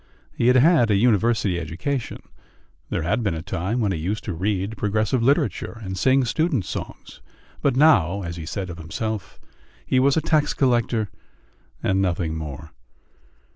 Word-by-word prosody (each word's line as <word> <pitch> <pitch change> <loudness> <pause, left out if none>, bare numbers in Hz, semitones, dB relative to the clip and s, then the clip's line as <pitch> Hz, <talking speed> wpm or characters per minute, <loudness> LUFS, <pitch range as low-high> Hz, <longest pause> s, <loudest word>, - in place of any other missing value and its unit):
He 120 - 0
had 125 - +5
had 135 -2 +5
a 105 - +3
university 110 -3 +2
education; 90 - -4 0.7
there - - -2
had 105 +9 0
been 100 -7 -1
a 80 - -6
time 95 +5 -2
when 105 -4 +1
he 85 - -2
used 100 +7 -3
to 95 - -4
read 100 +4 -2
progressive 110 +3 0
literature 125 - 0
and 95 -1 -4
sing 130 +6 +3
students' 135 - 0
songs, - - -7 0.4
but 140 -3 +2
now, 100 - +4
as 85 -1 -5
he 80 -2 -7
said 95 -1 -4
of 85 - -9
himself, 105 +5 -5 0.5
he 130 - +2
was 135 +2 +3
a - - +5
tax 150 -1 +1
collector 120 -5 +1 0.7
and 95 0 +2
nothing 85 -3 -1
more. 80 0 -7
105 Hz, 165 wpm, -23 LUFS, 90-125 Hz, 0.7 s, had